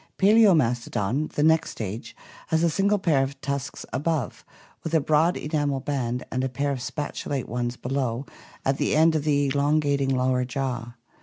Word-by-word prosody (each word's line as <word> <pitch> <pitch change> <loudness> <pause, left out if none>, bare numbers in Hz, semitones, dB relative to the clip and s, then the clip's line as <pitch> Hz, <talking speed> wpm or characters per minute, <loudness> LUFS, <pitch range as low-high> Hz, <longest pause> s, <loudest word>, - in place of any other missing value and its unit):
Palaomastodon, 155 - +3
the 150 - 0
next 160 +1 +3
stage, 110 +2 -6 0.3
has 160 +1 +1
a 170 - +3
single 200 +5 +2
pair 165 -8 +2
of 135 +1 -3
tusks 140 0 -4
above, 150 0 -2 0.4
with 165 0 -2
a - - +6
broad 155 +4 +2
enamel 145 -2 -1
band, 125 -3 -2
and 130 0 -1
a 130 - 0
pair 140 +3 -1
of 135 - -3
spatulate 140 0 -4
ones 120 +1 -3
below 130 -1 -2 0.4
at 135 0 +1
the - - +1
end 160 +1 +5
of 155 -2 0
the 145 -2 +2
elongating 145 -1 +1
lower 130 -1 +1
jaw. 125 -2 -4
140 Hz, 165 wpm, -25 LUFS, 125-155 Hz, 0.4 s, a